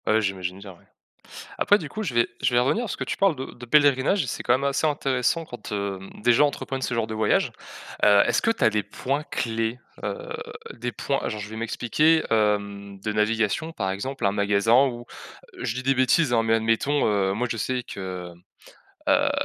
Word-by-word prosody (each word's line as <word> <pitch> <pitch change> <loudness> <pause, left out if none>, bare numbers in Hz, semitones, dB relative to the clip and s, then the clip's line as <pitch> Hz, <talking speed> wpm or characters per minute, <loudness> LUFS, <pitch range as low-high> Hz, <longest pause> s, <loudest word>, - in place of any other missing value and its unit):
Ah, - - +3
ouais, 110 - +3
j'imagine 95 -3 -3
bien, 100 0 -10
ouais. 85 - -19 0.7
Après, 205 - +5
du 155 -7 -7
coup, 215 - -5
je 150 - -3
vais 120 - +4
je - - +1
vais - - +6
revenir 175 - +1
parce - - -4
que - - -4
tu - - -4
parles 195 -5 +3
de 130 - -5
de 120 - -11
pèlerinage, 145 +5 +4
c'est, 120 - -4
quand - - +2
même, 135 - +1
assez 140 +3 +1
intéressant 140 +2 0
quand, 120 -6 -9
hem, 100 -2 -4
des 120 - +5
gens 145 +5 +5
entreprennent 135 -1 -5
ce 125 - -2
genre 115 - +1
de 110 - -6
voyage. 110 0 +1 0.5
Heu, 100 -1 +7
est-ce - - +2
que - - +1
tu 225 - 0
as - - +6
les 105 -1 0
points-clés? 120 -4 -2 0.3
Heu, - - -4 0.4
des 120 +1 -4
points 140 +3 -1
alors 110 - -4
je 105 0 -6
vais 110 - -8
m'expliquer, 150 +8 +2
hem, 100 -2 0
de 105 +2 -3
navigation, 110 - 0
par 95 -7 -2
exemple, 130 +8 -4
un 100 - +3
magasin 105 +6 +3
ou- 120 -2 -6 0.5
je 110 - -2
dis 130 - -4
des 135 +1 +3
bêtises, 130 +2 +3
hein- 115 - +4
mais 115 0 +3
admettons, 115 +6 +1
heu, 100 -2 +1
moi, 120 +5 -1
je 115 - -2
sais 125 +3 -2
que, 90 -4 -7 0.8
heu - - +6
heu, - - +3
115 Hz, 215 wpm, -25 LUFS, 105-135 Hz, 0.8 s, Heu